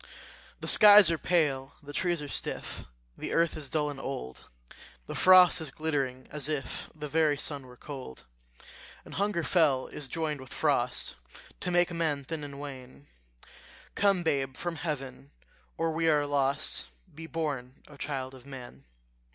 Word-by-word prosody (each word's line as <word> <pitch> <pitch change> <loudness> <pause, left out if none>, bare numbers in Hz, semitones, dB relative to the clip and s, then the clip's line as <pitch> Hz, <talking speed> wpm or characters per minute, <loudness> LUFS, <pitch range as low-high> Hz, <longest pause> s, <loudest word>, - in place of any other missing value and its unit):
The - - -5
skies 205 -4 +9
are 165 - -1
pale, 145 -7 0
the 145 0 -9
trees 175 0 -1
are - - -6
stiff, - - -5 0.3
The - - -4
earth 170 -1 +2
is 145 -3 -5
dull 150 0 0
and 140 - -9
old; 65 - -6 0.6
The - - -6
frost 180 -1 +7
is 155 - -2
glittering 135 -5 -2
as 150 0 -2
if 140 -5 -3
The 150 -1 -6
very 155 -1 +2
sun 140 -2 -3
were 125 0 -14
cold. 130 - -9 0.8
And - - -11
hunger 200 -3 0
fell 150 -8 +3
is 145 - -5
joined 150 0 -3
with 130 +1 -12
frost, 125 - 0 0.4
To - - -3
make 175 0 +3
men 160 -4 -1
thin 155 +2 -5
and 140 -1 -8
wan: 140 -1 -10 0.8
Come, 195 -3 +2
babe, 135 -5 -1
from 175 -2 -4
heaven, 135 - -5 0.5
or 165 0 0
we 165 +1 +1
are 150 -2 +3
lost; 140 - 0 0.3
Be 160 +2 -8
born, 140 -6 -4
O 150 - -14
child 135 -2 -4
of 130 -2 -13
man. 125 - -11
145 Hz, 160 wpm, -29 LUFS, 135-165 Hz, 0.8 s, skies